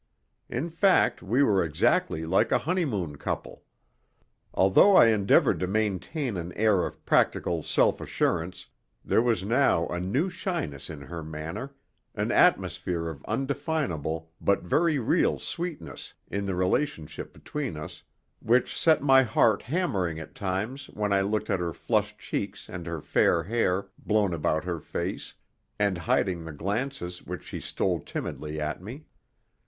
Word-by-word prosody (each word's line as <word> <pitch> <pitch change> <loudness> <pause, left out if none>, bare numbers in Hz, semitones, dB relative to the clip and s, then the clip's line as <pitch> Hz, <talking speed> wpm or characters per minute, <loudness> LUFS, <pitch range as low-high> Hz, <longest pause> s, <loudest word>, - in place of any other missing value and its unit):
In 165 - -2
fact, 185 +3 +3
we 115 +10 +2
were 100 -8 +3
exactly 80 0 +1
like 90 +4 +2
a - - +5
honeymoon 120 - -1
couple. - - -4 0.9
Although 95 - +5
I 115 - +8
endeavored 100 -3 +3
to 90 - -1
maintain 110 - -1
an 85 0 -5
air 105 -4 +2
of - - -13
practical 85 -2 +2
self - - +2
assurance 90 +1 -1 0.4
there - - +3
was 115 -6 +1
now 115 -6 +3
a 85 - -2
new 105 - 0
shyness 170 - -4
in 75 -3 -8
her 85 +4 -7
manner, 80 - -6 0.4
an - - -1
atmosphere 90 -2 +2
of 70 -3 -9
undefinable 110 - -2
but 100 - +2
very 155 - +2
real 135 +7 +2
sweetness 175 -2 -6 0.2
in 100 0 -2
the 95 - -1
relationship 90 - -1
between 140 - -5
us 75 - -8 0.4
which 120 +3 +2
set 160 -3 +4
my 135 -2 +7
heart 110 -3 +3
hammering 100 - -1
at 80 - -9
times 105 +9 -3
when 105 -1 -2
I 100 - +3
looked 105 +2 -1
at 95 - +1
her 85 -2 -2
flushed - - -1
cheeks - - -4
and 90 -2 -7
the 85 -2 -4
fair 85 +3 +2
hair, 100 -1 0
blown 105 -4 +1
about 80 -1 0
her 85 -2 -3
face, - - -5 0.4
and 100 -2 +2
hiding 85 +1 0
the 80 -1 -7
glances 100 - -3
which - - -7
she - - -6
stole - - -1
timidly 75 0 -5
at 75 +3 -3
me. 125 +11 -9
95 Hz, 150 wpm, -27 LUFS, 85-130 Hz, 0.9 s, I